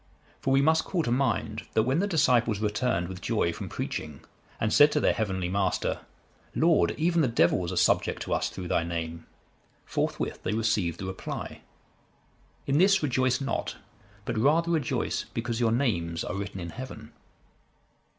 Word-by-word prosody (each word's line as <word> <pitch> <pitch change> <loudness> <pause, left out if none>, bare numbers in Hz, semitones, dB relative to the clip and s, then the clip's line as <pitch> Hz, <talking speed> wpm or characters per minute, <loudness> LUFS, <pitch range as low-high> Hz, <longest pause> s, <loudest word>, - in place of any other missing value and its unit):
For - - -2
we 135 +1 +4
must 160 +2 +4
call 175 -4 -1
to 120 - -1
mind, 125 -3 0
that 110 - +4
when 130 +7 +1
the 200 - +1
disciples 120 - +3
returned 105 -4 0
with 95 0 -8
joy 105 -7 0
from - - -6
preaching, 75 -2 -5 0.4
and 110 - 0
said 145 +1 +7
to 150 - +2
their - - +3
Heavenly 95 -5 -1
Master, 95 +1 0 0.6
'Lord, 85 -1 +3
even 170 +1 +2
the 145 - +3
devils 90 -5 +2
are - - -4
subject - - +2
to - - -2
us - - 0
through 90 -2 -7
Thy - - +2
Name;' 85 -1 -5 0.6
forthwith - - -2
they 105 - -1
received 105 -7 0
the 95 - -4
reply, 95 0 -6 1.0
'In 140 +2 +2
this 195 -1 +4
rejoice 130 -2 +1
not; 135 -1 -2 0.5
but 115 -2 -2
rather 160 +7 +3
rejoice, 155 -7 -1
because 115 0 -2
your 115 -2 +2
names 85 -10 0
are - - -4
written 100 0 -5
in 85 -1 -6
heaven. 130 +6 -9
115 Hz, 170 wpm, -28 LUFS, 90-135 Hz, 1.0 s, said